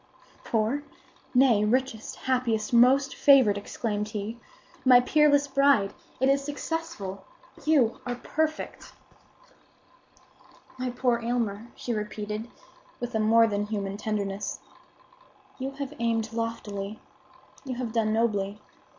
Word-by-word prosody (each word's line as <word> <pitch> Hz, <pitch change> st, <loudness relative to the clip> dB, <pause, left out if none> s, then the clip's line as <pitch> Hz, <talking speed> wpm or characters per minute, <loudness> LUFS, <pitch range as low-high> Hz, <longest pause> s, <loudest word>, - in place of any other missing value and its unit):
"Poor? 225 Hz, +5 st, 0 dB, 0.5 s
Nay, 250 Hz, -5 st, +5 dB
richest, 235 Hz, 0 st, -1 dB
happiest, 245 Hz, -4 st, -1 dB
most 265 Hz, +3 st, +5 dB
favored!" 265 Hz, -8 st, +6 dB
exclaimed 210 Hz, +1 st, -3 dB
he. 215 Hz, +2 st, -5 dB, 0.4 s
"My 255 Hz, -1 st, +8 dB
peerless 285 Hz, +2 st, +4 dB
bride, 275 Hz, -7 st, +3 dB, 0.3 s
it 265 Hz, -, +3 dB
is 275 Hz, 0 st, +3 dB
successful! 290 Hz, -, -5 dB, 0.4 s
You 280 Hz, -7 st, +3 dB
are 245 Hz, -1 st, -3 dB
perfect!" 310 Hz, +5 st, -3 dB, 1.9 s
"My 255 Hz, 0 st, -1 dB
poor 245 Hz, -1 st, +1 dB
Aylmer," 230 Hz, -2 st, -2 dB
she 240 Hz, -, -3 dB
repeated, 210 Hz, +1 st, -4 dB, 0.5 s
with 245 Hz, 0 st, -5 dB
a 220 Hz, -, +1 dB
more 225 Hz, +1 st, +5 dB
than 205 Hz, -1 st, -1 dB
human 200 Hz, -2 st, -3 dB
tenderness, 205 Hz, -1 st, -3 dB, 1.0 s
"you 265 Hz, +1 st, -2 dB
have 280 Hz, 0 st, -5 dB
aimed 225 Hz, -1 st, 0 dB
loftily; 220 Hz, -3 st, -4 dB, 0.6 s
you 260 Hz, -2 st, -4 dB
have 240 Hz, -3 st, -4 dB
done 220 Hz, -2 st, +1 dB
nobly. 210 Hz, -3 st, 0 dB
230 Hz, 115 wpm, -27 LUFS, 210-265 Hz, 1.9 s, My